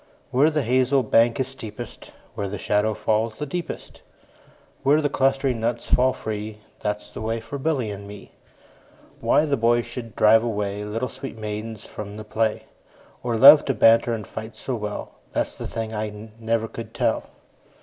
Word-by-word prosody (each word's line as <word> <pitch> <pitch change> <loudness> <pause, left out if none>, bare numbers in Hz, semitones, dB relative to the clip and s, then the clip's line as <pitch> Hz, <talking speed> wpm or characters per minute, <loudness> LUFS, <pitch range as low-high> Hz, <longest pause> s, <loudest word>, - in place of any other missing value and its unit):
Where 140 +5 +4
the 150 -2 0
hazel 130 +2 +3
bank 115 +2 +3
is 130 - +1
steepest, 115 -3 -8 0.2
Where 100 -1 -3
the 105 - -4
shadow 105 +3 +1
falls 110 +1 0
the 150 - -4
deepest, 170 +4 -6 0.8
Where 140 +3 +4
the 145 -2 0
clustering 135 -3 +1
nuts 115 +1 -1
fall 130 +1 +3
free, 110 -2 -5
15 105 0 -22 0.2
That 105 0 -1
's - - -11
the - - -7
way 115 +1 -1
for 115 +5 -7
Billy 135 -7 0
and 100 0 -8
me. 100 0 -11 0.9
Why 150 - +3
the 145 -2 +1
boys 120 +1 +3
should 115 -4 -7
drive 110 +1 +6
away 105 -3 -2
Little 115 +4 -2
sweet 130 0 -8
maidens 110 0 -5
from 105 0 -8
the 110 - -6
play, 110 0 -1 0.6
Or 120 -2 -1
love 145 +5 +10
to 135 - 0
banter 115 +1 +5
and 110 -3 -3
fight 110 +2 -8
so 130 - -4
well, 105 -3 -4 0.2
That - - +1
's - - -9
the - - -6
thing 110 -1 -4
I 105 0 -5
never 115 0 0
could 115 +1 -9
tell. - - +1
115 Hz, 185 wpm, -24 LUFS, 105-130 Hz, 0.9 s, love